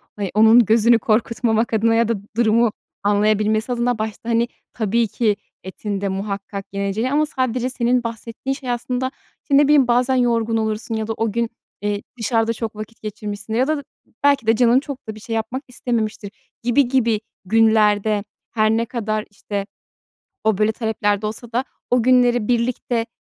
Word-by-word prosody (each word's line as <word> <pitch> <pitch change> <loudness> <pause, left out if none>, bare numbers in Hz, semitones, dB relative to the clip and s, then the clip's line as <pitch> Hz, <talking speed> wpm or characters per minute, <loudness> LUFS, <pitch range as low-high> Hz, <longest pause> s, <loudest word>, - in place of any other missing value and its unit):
hani, 200 -3 -3
onun 220 +2 +7
gözünü 230 +2 +4
korkutmamak 225 +1 +1
adına 225 +1 +3
ya 230 0 +3
da 230 - +1 0.2
durumu 230 0 +3 0.3
anlayabilmesi 215 +2 +2
adına, 245 0 0
başta, 220 +1 -4
hani, 235 +1 +2 0.3
tabii 225 +1 +1
ki 215 0 +1 0.3
etin 195 +1 -5
de 200 - -1
muhakkak 195 0 -4
yeneceği 200 +5 -1
ama 300 +2 +3
sadece 255 -3 -1
senin 245 -1 +1
bahsettiğin 230 +3 -4
şey 270 -2 -7
aslında 250 +2 -2 0.4
ne 280 +1 +6
bileyim, 290 -3 +5
bazen 250 +2 +2
yorgun 230 -2 +1
olursun 220 +1 -2
ya 220 -1 -2
da 225 - -1
o 225 -1 0
gün, 235 +1 -1 0.3
eee, 205 0 -1 0.2
dışarıda 225 0 +1
çok 225 -1 -5
vakit 215 +2 -9
geçirmişsin 210 0 -6
ya 250 +4 +2
da 305 -2 -1 0.4
belki 280 -5 +3
de 225 - +5
canın 240 +2 +4
çok 280 -3 -8
da 220 - -5
bir - - -11
şey 225 +2 -4
yapmak 235 +5 -3
istememiştir 225 -5 -3 0.3
gibi 245 +3 +3
gibi 235 -4 +2 0.3
günlerde, 215 -1 +3 0.3
her 215 -2 +2
ne 225 +1 +1
kadar, 215 -3 -2
işte, 200 0 -5 0.8
o 220 -3 +2
böyle 215 +1 +3
taleplerde 215 -2 -1
olsa 225 +2 -7
da, 245 +3 0 0.3
o 245 -1 +3
günleri 245 -2 +3
birlikte, 235 -1 0
225 Hz, 165 wpm, -21 LUFS, 215-245 Hz, 0.8 s, onun